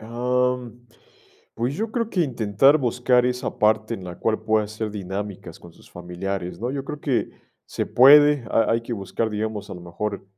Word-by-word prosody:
Am, 125 +1 -2 0.7
pues, 120 +4 -2
yo 220 +5 -3
creo 230 0 -2
que 180 - 0
intentar 125 0 +3
buscar 125 -1 +2
esa 125 0 -3
parte 110 +1 +2
en 95 - -8
la 90 -1 -8
cual 110 -1 0
pueda 110 -1 +1
ser 110 0 -5
dinámicas 100 -3 -6
con 85 -1 -15
sus - - -20
familiares, 90 +1 -5
¿no? 120 +2 -2
Yo 135 -1 -4
creo 150 +1 -7
que 125 -8 -1 0.3
se - - -4
puede, 145 0 +6
ha 115 - +2
hay 115 0 0
que 120 - -6
buscar, 110 +2 -3
digamos, 105 -1 -4
a - - -6
lo 90 - -10
mejor, 95 +4 -5
115 Hz, 185 wpm, -23 LUFS, 100-125 Hz, 0.7 s, puede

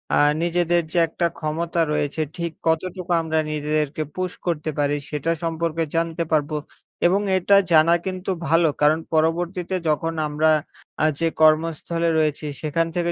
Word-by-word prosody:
আ - - +3 0.3
নিজেদের 175 0 +2
যে - - -1
একটা 165 +2 -2
ক্ষমতা 165 +2 -1
রয়েছে, 150 +1 -1 0.2
ঠিক 170 -1 -2 0.2
কতটুকু 180 +3 -1
আমরা 160 -1 0
নিজেদেরকে 150 0 -1
পুশ 185 -1 -2 0.2
করতে 160 -2 -1
পারি 145 0 +1
সেটা 150 +2 -1
সম্পর্কে 165 0 -1
জানতে 165 0 0
পারবো। 150 -1 +1 0.5
এবং 190 +3 +2 0.2
এটা 195 +2 +3 0.2
জানা 160 +1 +6
কিন্তু 185 0 -3 0.2
ভালো, 165 +2 +4
কারণ 150 +2 +4
পরবর্তীতে 175 +3 0
যখন 165 +2 0
আমরা 150 +1 +2 0.5
আ - - +5
যে 165 - +2
কর্মস্থলে 165 +2 +2
রয়েছি 155 -1 0 0.2
সেখান 165 +2 0
থেকে 175 -1 0
165 Hz, 145 wpm, -22 LUFS, 155-170 Hz, 0.5 s, জানা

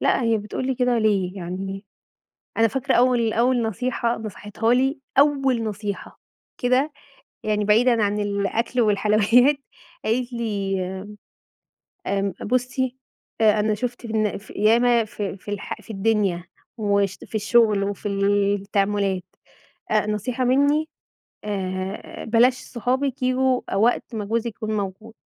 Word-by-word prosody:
لأ - - +2
هي 230 -1 +2
بتقول 215 +5 -4
لي 265 - 0
كده 250 -1 +1
ليه، 200 -4 +1
يعني 195 +2 -5 0.7
أنا 225 0 +5
فاكرة 255 +4 -1
أول 240 -2 +3
أول 245 +1 +2
نصيحة 235 +2 -1
نصحِتها 215 +1 -2
لي، 270 +3 +1 0.2
أول 275 -4 +3
نصيحة 205 -2 -5 0.4
كده، 255 +4 +2 0.5
يعني 210 -1 0
بعيدًا 230 +2 +4
عن 205 0 +1
الأكل 205 +4 -1
والحلويات، 215 +5 +4 0.5
قالت 240 +3 0
لي 205 -5 -2 1.3
آمم، 195 -1 0
بُصّي، 255 +2 -1 0.5
أ 215 -1 +5
أنا 215 +1 +2
شُفت 240 +3 -4
في 220 - -5
الن 215 -2 +1
في 205 - -13
ياما 235 +2 +3
في 205 -2 -5
في 205 - -9
الح 205 -1 -5
في - - -21
الدنيا 195 -4 +1 0.3
وش 200 -3 +1
في - - -9
الشغل 215 -1 +3
وفي 200 0 -3
التعاملات، 200 -1 +1 0.7
أ 215 -1 +2
نصيحة 225 +5 -2
مني 285 +5 +3 0.6
آآ، 190 -1 -4
بلاش 235 +3 +4
صحابِك 255 +2 -2
ييجوا 255 0 +2
وقت 230 +3 +1
ما 210 - -3
جوزِك 230 +3 -1
يكون 215 -1 -3
موجود. 205 +3 -5
220 Hz, 130 wpm, -23 LUFS, 200-245 Hz, 1.3 s, أنا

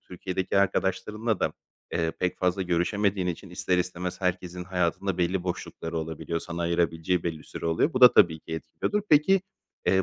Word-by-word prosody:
Türkiye'deki 95 +1 -2
arkadaşlarınla 105 +3 0
da, - - +1 0.4
eee, 80 -1 +1
pek 90 -1 0
fazla 90 +1 +1
görüşemediğin 95 +2 +1
için 90 +2 -4
ister 90 0 0
istemez 90 +1 -3
herkesin 90 -1 -2
hayatında 90 +1 -1
belli 90 +1 +1
boşlukları 85 -2 -4
olabiliyor, 80 +1 -3
sana 85 0 -5
ayırabileceği 85 0 +1
belli 85 -2 -3
bir - - -15
süre - - -6
oluyor. 85 - +2
Bu 130 - -1
da 125 -1 +10
tabii 80 -2 +5
ki 80 - -9
etkiliyordur. 85 - -2
Peki, 180 +6 +5 0.4
eee, 95 0 +4
90 Hz, 170 wpm, -27 LUFS, 85-95 Hz, 0.4 s, da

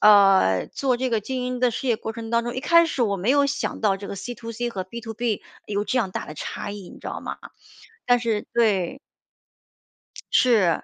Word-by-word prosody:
啊， 195 - +6
做 260 -3 +1
这 255 +1 -1
个 225 -2 +1
经 255 +4 -3
营 250 0 -2
的 250 -1 +4
事 235 - -4
业 235 - +3
过 220 +1 -5
程 225 -1 -7
当 235 0 +2
中， 240 - -3
一 255 - -2
开 335 +4 +5
始 275 -6 -1
我 200 -3 +1
没 195 +6 0
有 285 +1 +4
想 280 0 -2
到 205 -3 +2
这 200 +1 -8
个 - - -4
C2C 235 +2 -5
和 190 -5 -4
B2B 225 +1 -3 0.3
有 205 0 -1
这 250 +5 0
样 205 -6 0
大 - - -4
的 155 - -8
差 155 - -5
异， 200 -3 -8
你 - - -12
知 - - -8
道 - - -4
吗？ - - -5 0.7
但 245 0 +5
是 225 -3 -1
对。 220 -2 +2 1.3
是， 215 -9 +4
230 Hz, 240 characters per minute, -24 LUFS, 200-245 Hz, 1.3 s, 啊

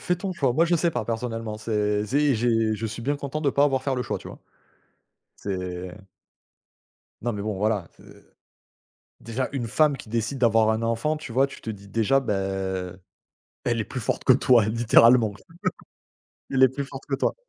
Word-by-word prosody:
fais 180 - 0
ton 190 +2 -4
choix, 135 -7 +1
moi 160 +7 +3
je 175 +1 +2
sais 170 +1 +2
pas - - -3
personnellement, 115 -2 -3
c'est 105 -1 0
tu 105 - -5
sais, 145 +2 +3
j'ai 115 -1 +1
je 115 +2 -3
suis 110 +1 -6
bien 140 +4 0
content 140 +1 -4
de 150 - +1
pas 140 - +2
avoir 135 -2 +2
faire 135 - 0
le 125 - -1
choix, - - -3
tu - - -12
vois? - - -10 1.0
C'est 90 0 -5 1.2
Non 120 +1 -1
mais 105 -2 -4
bon 105 0 -2
voilà, 105 -3 0
heu, - - -18 0.9
déjà 115 +3 -2
une 125 -4 -2
femme 150 +5 +3
qui 120 - -11
décide 115 +4 -2
d'avoir 115 -2 +4
un 110 +1 -1
enfant, 115 +7 0
tu 150 -6 -8
vois? 135 +3 +3
Tu - - -12
te - - -6
dis 100 -2 -8
déjà, 115 +6 +2
beh, 130 -6 -2 1.3
elle 120 -1 0
est 110 - -2
plus 130 - -5
forte - - -2
que 130 - +7
toi 125 -3 +4
littéralement, 115 0 +5 1.2
elle 130 -1 +2
est 130 - +6
plus 140 +3 -4
forte 135 0 -9
que 140 - -1
toi. 135 - 0
120 Hz, 200 wpm, -25 LUFS, 110-135 Hz, 1.3 s, que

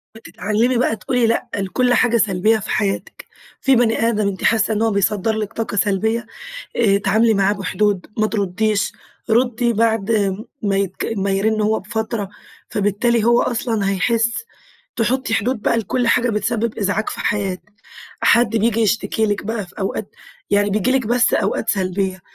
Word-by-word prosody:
بتتعلمي 225 +4 -1
بقى 235 -2 +1
تقولي 240 +3 0
لأ 230 - 0
لكل 225 +6 +1
حاجة 240 -1 +3
سلبية 215 +1 +2
في 215 - -8
حياتك، 200 -2 -2 0.4
في 270 -1 +4
بني 230 -2 +2
آدم 210 -2 0
أنتِ 195 -1 -4
حاسّة 220 -1 +2
إن 210 - -1
هو 225 0 +2
بيصدر 200 +1 +1
لِك 215 0 -4
طاقة 225 -2 -4
سلبية، 215 +3 +1 0.6
آآ، 210 -4 +3
اتعاملي 215 +3 +2
معاه 200 0 +2
بحدود، 200 -1 -1
ما 215 0 +2
ترديش، 205 0 0 0.4
ردي 240 0 +2
بعد 225 -1 +1 0.5
ما 200 -1 +1
يك 195 +3 -2
ما 195 0 0
يرن 215 +3 +1
هو 215 +1 +1
بفترة، 215 0 -3 0.4
فبالتالي 215 +3 +1
هو 235 +1 +4
أصلًا 225 -4 -1
هيحس 230 - 0 0.5
تحطي 240 +1 0
حدود 225 +1 0
بقى 230 - +1
لكل 230 +3 -1
حاجة 245 +1 +3
بتسبب 225 +1 -1
إزعاج 205 +1 0
في - - -7
حياتِك، 200 0 -2 0.5
حد 235 -1 +4
بييجي 230 +1 +1
يشتكي 220 0 +1
لِك 205 -1 -2
بقى 220 -2 -3
في 175 - -14
أوقات 195 0 -4 0.3
يعني 205 0 +2
بييجي 215 +5 +1
لِك 260 -4 +1
بس 245 +1 +2
أوقات - - 0
سلبية، 190 -1 -1
215 Hz, 160 wpm, -19 LUFS, 200-230 Hz, 0.6 s, في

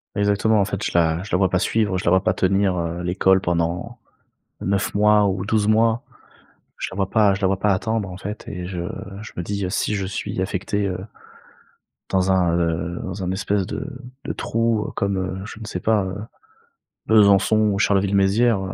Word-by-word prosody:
Exactement. 105 +2 +2
En 100 - +3
fait, 100 0 -4
je - - -1
la 85 0 +2
je 105 - -9
la - - +3
vois 95 -1 +2
pas 90 - +1
suivre 105 -1 +1
je 90 - -4
la - - +2
vois 95 0 +4
pas 90 - +2
tenir, 95 0 +1
heu, 85 0 -3
l'école 95 +2 +3
pendant 85 +7 -2 0.7
9 100 +1 -1
mois 105 0 +4
ou 95 -1 -1
12 105 0 +1
mois. 115 +1 +3 0.7
Je - - -3
la - - -8
vois 95 -1 -1
pas 105 -3 +4
je 100 - -7
la 95 - +3
vois 95 0 0
pas 105 - +1
attendre, 110 +1 -1
en 90 - -8
fait, 105 +3 -7
et 90 -1 -5
je 90 -1 -5 0.4
je 110 - -9
me 90 - -2
dis: 100 +2 -3
«Si 105 - -1
je 100 -1 -2
suis 95 0 -4
affecté, 100 +2 -1
heu» 90 -2 -3 1.1
«dans 95 0 +2
un, 90 -3 +2
heu, 85 0 -1
dans 95 +1 -5
un 90 - -1
espèce 100 0 0
de 135 - -5 0.4
de - - -2
trou 115 -1 -1
comme, 100 -1 0
heu, 95 0 -3
je 105 - -9
ne 110 - -8
sais 90 - -4
pas, 110 +1 +2
heu, 95 0 -5 0.9
Besançon, 105 0 +4
Charleville-Mézières, 100 +3 +3
95 Hz, 200 wpm, -22 LUFS, 95-105 Hz, 1.1 s, vois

